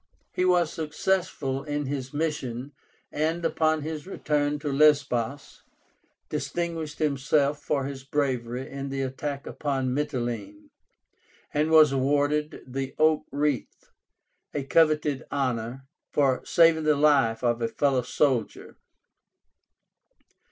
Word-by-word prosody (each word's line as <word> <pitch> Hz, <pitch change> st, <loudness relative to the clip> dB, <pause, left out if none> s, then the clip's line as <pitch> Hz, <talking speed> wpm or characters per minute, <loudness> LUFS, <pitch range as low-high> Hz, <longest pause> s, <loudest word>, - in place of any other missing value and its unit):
He 180 Hz, -, +1 dB
was 175 Hz, -3 st, +3 dB
successful 155 Hz, -4 st, -1 dB
in 145 Hz, 0 st, -3 dB
his 135 Hz, -1 st, -4 dB
mission, 145 Hz, -4 st, -3 dB, 0.4 s
and, 160 Hz, +3 st, -1 dB
upon 155 Hz, -2 st, +1 dB
his 155 Hz, +1 st, -5 dB
return 150 Hz, -5 st, 0 dB
to 145 Hz, -1 st, -3 dB
Lesbos, 140 Hz, -3 st, +2 dB, 0.7 s
distinguished 165 Hz, -3 st, -3 dB
himself 145 Hz, 0 st, +1 dB
for 140 Hz, -2 st, -1 dB
his 135 Hz, -1 st, -6 dB
bravery 130 Hz, -3 st, -2 dB
in 140 Hz, 0 st, -6 dB
the 135 Hz, 0 st, -2 dB
attack 140 Hz, +2 st, -4 dB
upon 135 Hz, -3 st, -2 dB
Mityléne, 120 Hz, -7 st, -3 dB, 0.8 s
and 150 Hz, +2 st, +1 dB
was 155 Hz, -2 st, +7 dB
awarded 145 Hz, +3 st, 0 dB
the 135 Hz, +1 st, -5 dB
oak 155 Hz, 0 st, +3 dB
wreath, 145 Hz, -2 st, -2 dB, 0.6 s
a 145 Hz, -, -1 dB
coveted 150 Hz, -2 st, +2 dB
honor, 130 Hz, -2 st, -2 dB, 0.3 s
for 135 Hz, -3 st, +2 dB
saving 165 Hz, -2 st, +4 dB
the 150 Hz, -1 st, +4 dB
life 140 Hz, -6 st, +3 dB
of 120 Hz, -1 st, +1 dB
a 115 Hz, -, +1 dB
fellow 135 Hz, +1 st, +1 dB
soldier. 125 Hz, -1 st, -1 dB
145 Hz, 115 wpm, -26 LUFS, 130-155 Hz, 0.8 s, was